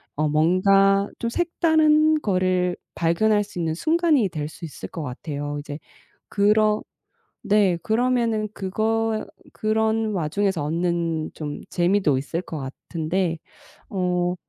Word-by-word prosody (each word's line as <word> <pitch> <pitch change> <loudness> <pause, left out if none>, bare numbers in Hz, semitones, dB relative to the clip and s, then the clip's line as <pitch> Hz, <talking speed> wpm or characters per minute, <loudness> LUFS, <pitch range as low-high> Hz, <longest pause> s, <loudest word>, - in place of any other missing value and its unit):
어 150 +1 0
뭔가 195 +5 +3
좀 235 - -1
색다른 315 0 +3
거를 185 -3 +1 0.2
발견할 205 +6 +2
수 200 -3 -9
있는 160 -2 -1
순간이 315 - +2
될 155 -4 -4
수 155 - -13
있을 150 - -8
것 165 - -6
같아요. 145 +2 -5
이제 145 0 -7 0.5
그런 210 +1 +3 0.6
네. 205 -5 +3
그러면 230 -2 +1
그거 220 +3 -1 0.3
그런 220 0 0
와중에서 185 0 0
얻는 165 0 -1
좀 150 -2 -6
재미도 175 -5 +2
있을 160 +5 -3
것 165 - -7
같은데 165 +5 -3 0.5
어 180 -2 0
190 Hz, 230 characters per minute, -23 LUFS, 165-220 Hz, 0.6 s, 뭔가